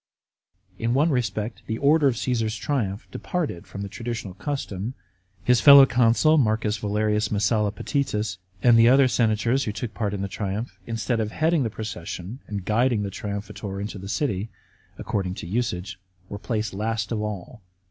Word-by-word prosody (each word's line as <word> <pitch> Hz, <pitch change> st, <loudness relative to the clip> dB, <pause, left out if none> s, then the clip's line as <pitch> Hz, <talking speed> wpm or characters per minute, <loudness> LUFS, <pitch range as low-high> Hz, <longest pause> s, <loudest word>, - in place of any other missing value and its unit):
In 115 Hz, +2 st, 0 dB
one 150 Hz, +4 st, +3 dB
respect 110 Hz, -4 st, -2 dB
the 110 Hz, -, -2 dB
order 145 Hz, +2 st, +4 dB
of 125 Hz, -4 st, +1 dB
Caesar's 115 Hz, -4 st, -1 dB
triumph 105 Hz, -3 st, -2 dB
departed 155 Hz, -, -3 dB
from 100 Hz, -, -6 dB
the -, -, -4 dB
traditional 115 Hz, -2 st, -5 dB
custom. 115 Hz, -3 st, -4 dB, 0.5 s
His 125 Hz, 0 st, +4 dB
fellow 140 Hz, -1 st, +10 dB
consul 125 Hz, +5 st, +4 dB
M. 110 Hz, -1 st, +2 dB
Valerius 105 Hz, 0 st, 0 dB
Messalla 105 Hz, 0 st, +2 dB
Potitus, 105 Hz, -4 st, -2 dB, 0.2 s
and 120 Hz, -2 st, +6 dB
the 115 Hz, +1 st, +7 dB
other 135 Hz, +1 st, +6 dB
senators 120 Hz, +2 st, +1 dB
who 105 Hz, -, -1 dB
took 105 Hz, +2 st, -5 dB
part 105 Hz, -3 st, -2 dB
in 100 Hz, -, -3 dB
the -, -, -1 dB
triumph, 105 Hz, +4 st, -4 dB
instead 115 Hz, +1 st, -1 dB
of 110 Hz, -1 st, -1 dB
heading 160 Hz, +2 st, +2 dB
the 120 Hz, -, 0 dB
procession 105 Hz, 0 st, -6 dB
and 100 Hz, -3 st, -5 dB
guiding 115 Hz, 0 st, +2 dB
the 100 Hz, -, -3 dB
triumphator 100 Hz, 0 st, -5 dB
into 100 Hz, 0 st, -5 dB
the 95 Hz, +1 st, -8 dB
city, 105 Hz, -2 st, -1 dB, 0.5 s
according 95 Hz, -3 st, -2 dB
to -, -, -7 dB
usage, 100 Hz, -1 st, -2 dB, 0.3 s
were 100 Hz, -, -6 dB
placed 110 Hz, -2 st, -2 dB
last 110 Hz, +3 st, -2 dB
of 110 Hz, -2 st, -1 dB
all. 105 Hz, +2 st, -6 dB
110 Hz, 170 wpm, -25 LUFS, 100-125 Hz, 0.5 s, fellow